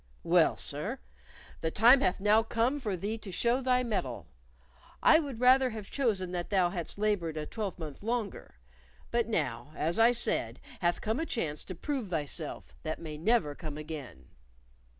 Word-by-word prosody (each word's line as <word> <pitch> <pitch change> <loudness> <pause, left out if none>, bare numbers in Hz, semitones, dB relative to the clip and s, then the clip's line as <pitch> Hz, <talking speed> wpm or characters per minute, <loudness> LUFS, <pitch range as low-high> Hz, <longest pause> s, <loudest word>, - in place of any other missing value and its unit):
Well, - - +4
sir, - - -2 0.6
the 160 - -1
time 240 +9 +6
hath 185 - +1
now 210 +2 +4
come 235 +5 0
for 210 -8 -2
thee 210 +5 -3
to 200 - -8
show 235 +7 +1
thy 250 -1 +2
mettle. 130 - -3 0.8
I 315 - +7
would 280 -7 -5
rather 255 +1 +6
have 215 -3 -8
chosen 205 -10 0
that 175 -1 -3
thou 185 -3 +2
hadst 175 -1 -3
labored 200 -7 0
a 150 - -3
twelvemonth 175 - -5
longer; 225 -1 -3 0.6
but 235 -1 +1
now, 150 - -2
as 165 +6 -1
I 230 +2 +7
said, 240 -1 -1 0.2
hath 175 -1 +1
come 220 +3 -1
a 325 - -1
chance 155 - -2
to 185 - -6
prove 255 - -3
thyself 155 -1 -3
that 155 0 -3
may 155 -2 -7
never 195 -4 +2
come 150 -1 -7
again. 150 - -8
200 Hz, 170 wpm, -30 LUFS, 160-235 Hz, 0.8 s, I